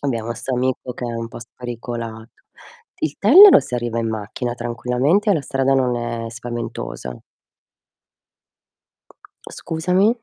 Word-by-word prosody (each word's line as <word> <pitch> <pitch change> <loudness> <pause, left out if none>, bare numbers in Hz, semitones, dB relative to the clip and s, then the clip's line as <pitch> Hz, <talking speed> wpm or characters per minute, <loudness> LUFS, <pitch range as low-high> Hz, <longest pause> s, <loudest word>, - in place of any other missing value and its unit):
Abbiamo 115 -4 -2
'sto 130 +2 -4
amico 125 0 -2
che 125 - -6
è 120 - -3
un 115 0 -4
po' - - -10
spericolato. 115 -1 -8 0.5
Il - - -2
Tellero 405 +1 +9
si - - -6
arriva 120 -1 -2
in 115 -1 -1
macchina, 110 +3 -4
tranquillamente, 125 - 0
e - - +5
la 155 - -1
strada 135 0 +1
non 125 -2 +1
è 120 -1 -4
spaventosa. 115 - -6 2.3
Scusami? 180 +5 0
120 Hz, 130 wpm, -20 LUFS, 115-135 Hz, 2.3 s, Tellero